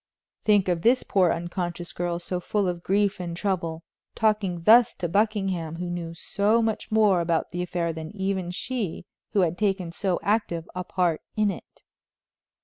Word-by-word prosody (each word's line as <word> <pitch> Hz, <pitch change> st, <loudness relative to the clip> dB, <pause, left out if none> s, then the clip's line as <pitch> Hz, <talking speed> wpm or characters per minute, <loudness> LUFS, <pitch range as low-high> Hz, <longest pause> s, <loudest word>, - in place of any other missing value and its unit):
Think 205 Hz, -3 st, +4 dB
of 175 Hz, -2 st, 0 dB
this 245 Hz, +5 st, +4 dB
poor 185 Hz, -3 st, +3 dB
unconscious 175 Hz, 0 st, -4 dB
girl, 175 Hz, -1 st, -2 dB
so 180 Hz, +1 st, -3 dB
full 200 Hz, +2 st, 0 dB
of 175 Hz, -1 st, -2 dB
grief 200 Hz, +2 st, +1 dB
and 170 Hz, -2 st, -4 dB
trouble, 170 Hz, -5 st, -2 dB, 0.3 s
talking 210 Hz, -6 st, +1 dB
thus 230 Hz, +5 st, +6 dB
to 180 Hz, -, -2 dB
Buckingham, 195 Hz, -4 st, 0 dB
who 175 Hz, +1 st, -4 dB
knew 170 Hz, -1 st, -5 dB
so 205 Hz, +5 st, +1 dB
much 225 Hz, -1 st, -1 dB
more 210 Hz, -5 st, +4 dB
about 165 Hz, -1 st, 0 dB
the 175 Hz, -, -3 dB
affair 175 Hz, -2 st, -1 dB
than 160 Hz, 0 st, -6 dB
even 190 Hz, -2 st, -1 dB
she, 195 Hz, -2 st, -3 dB, 0.3 s
who 200 Hz, -, +4 dB
had 175 Hz, -1 st, 0 dB
taken 195 Hz, -5 st, 0 dB
so 185 Hz, +1 st, -1 dB
active 200 Hz, -6 st, 0 dB
a 180 Hz, -, -3 dB
part 175 Hz, -3 st, 0 dB
in 210 Hz, -2 st, +2 dB
it. -, -, -12 dB
180 Hz, 170 wpm, -26 LUFS, 170-205 Hz, 0.3 s, thus